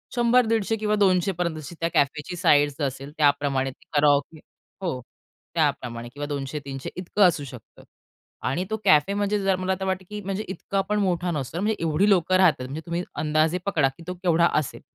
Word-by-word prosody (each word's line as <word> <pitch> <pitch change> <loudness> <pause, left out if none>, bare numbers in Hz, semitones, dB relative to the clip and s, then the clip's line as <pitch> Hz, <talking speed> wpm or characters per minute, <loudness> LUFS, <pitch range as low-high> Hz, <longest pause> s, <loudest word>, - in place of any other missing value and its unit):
100-150 230 -3 +3
किंवा 210 -1 0
200 190 -2 +3
पर्यंतची, 170 -3 -3
जशी 155 +4 -9
त्या 165 0 0
कॅफेची 150 +5 0
साईझ 145 -5 +3
असेल 135 +1 -3
त्याप्रमाणे 140 -2 +2
ते - - -23
कराओके 145 +1 +2 0.4
हो, 165 -9 -2 0.5
त्याप्रमाणे 120 -1 -1
किंवा 145 0 -5
200-300 140 -1 -5
इतकं 185 +3 0
असू 155 -4 -1
शकतं. 125 -5 -12 0.6
आणि 170 +8 0
तो 220 - -1
कॅफे, 150 +6 +4
म्हणजे 205 0 0
जर 195 -1 +3
मला 190 0 0
तर 190 - -3
वाटतं 190 0 -2
की 210 0 -6
म्हणजे 195 +1 -3
इतकंपण 195 +2 -2
मोठा 180 -3 0
नसतो. 150 +2 -3
म्हणजे 215 +2 +1
एवढी 165 +6 +2
लोकं 185 -1 +3
राहतात, 175 -8 +4
म्हणजे 145 +5 -6
तुम्ही 170 +1 -2
अंदाजे 155 +3 +1
पकडा 150 -9 +2
की 170 - -12
तो 180 - -3
केवढा 170 -1 +4
असेल? 145 - -6
170 Hz, 175 wpm, -25 LUFS, 145-195 Hz, 0.6 s, कॅफे